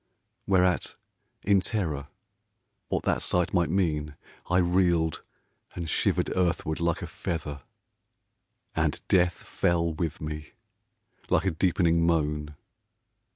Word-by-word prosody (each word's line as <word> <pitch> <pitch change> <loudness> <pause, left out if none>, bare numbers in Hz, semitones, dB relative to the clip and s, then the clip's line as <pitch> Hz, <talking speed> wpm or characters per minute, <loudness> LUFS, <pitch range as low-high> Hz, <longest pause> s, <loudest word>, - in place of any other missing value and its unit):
Whereat, 90 -2 +2 0.5
in 100 -1 +4
terror 80 -11 -2 0.8
what - - -1
that - - +1
sight 90 -1 +1
might 85 -3 +2
mean, 75 -5 0 0.3
I 90 - +3
reeled 85 -3 +2 0.5
and 85 -2 -4
shivered - - +1
earthward 85 -3 0
like 85 -1 0
a - - -2
feather. 75 -4 -4 1.1
And - - +1
Death 90 -2 +3
fell 85 -1 0
with 80 0 -3
me, 75 0 -6 0.8
like 90 - +2
a 95 - +2
deepening 85 0 +2
moan. 75 -2 0
85 Hz, 110 wpm, -27 LUFS, 75-90 Hz, 1.1 s, in